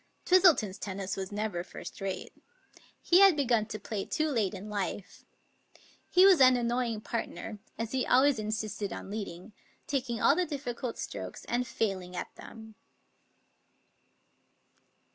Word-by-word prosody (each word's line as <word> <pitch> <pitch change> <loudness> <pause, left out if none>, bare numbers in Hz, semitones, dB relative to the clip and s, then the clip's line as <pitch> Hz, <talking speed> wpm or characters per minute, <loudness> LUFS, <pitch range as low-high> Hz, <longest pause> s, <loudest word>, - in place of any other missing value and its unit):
Twistleton's 310 - +4
tennis 195 -1 -4
was 190 0 -5
never 205 -4 -2
first - - -10
rate. 190 -2 -4 0.7
He 355 - +5
had 390 -4 +7
begun 235 -6 +2
to 215 - -5
play 205 0 -4
too 310 0 -1
late 215 -8 0
in 195 +2 -8
life. 200 -2 -5 0.8
He 365 +1 +6
was 375 -7 +7
an 255 -1 +7
annoying 235 -2 -1
partner, 225 -1 -5 0.2
as 230 -1 -4
he 260 -1 0
always 265 -1 +4
insisted 215 -1 -3
on 195 - -7
leading, 205 -1 -6 0.3
taking 255 -4 -2
all 280 - +5
the 360 +1 0
difficult 255 -5 -4
strokes, - - -6
and 245 +1 -1
failing 185 -4 -2
at - - -5
them. 220 -1 -12
225 Hz, 140 wpm, -30 LUFS, 200-260 Hz, 0.8 s, had